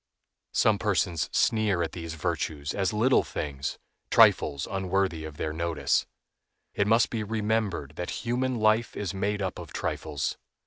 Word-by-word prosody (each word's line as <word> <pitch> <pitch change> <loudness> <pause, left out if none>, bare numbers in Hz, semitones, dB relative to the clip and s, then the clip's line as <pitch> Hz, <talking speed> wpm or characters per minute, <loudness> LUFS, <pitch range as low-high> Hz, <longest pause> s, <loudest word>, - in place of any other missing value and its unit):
Some 105 -2 +3
persons 90 -5 0
sneer 105 -6 +2
at 80 - -3
these 80 -2 -6
virtues 80 -3 -2
as 95 -1 0
little 115 +5 +4
things, 70 -2 -4 0.3
trifles 70 -2 +5
unworthy 95 -4 -1
of 75 -1 -9
their 75 +1 -2
notice. 85 0 0 0.7
It 100 - +1
must 115 +1 +4
be 115 -2 -1
remembered 105 -8 -1
that 90 - -4
human 125 +2 0
life 110 +1 +2
is 100 -1 -3
made 100 +1 -1
up 95 - -3
of - - -9
trifles. 75 -2 -3
95 Hz, 145 wpm, -27 LUFS, 80-110 Hz, 0.7 s, trifles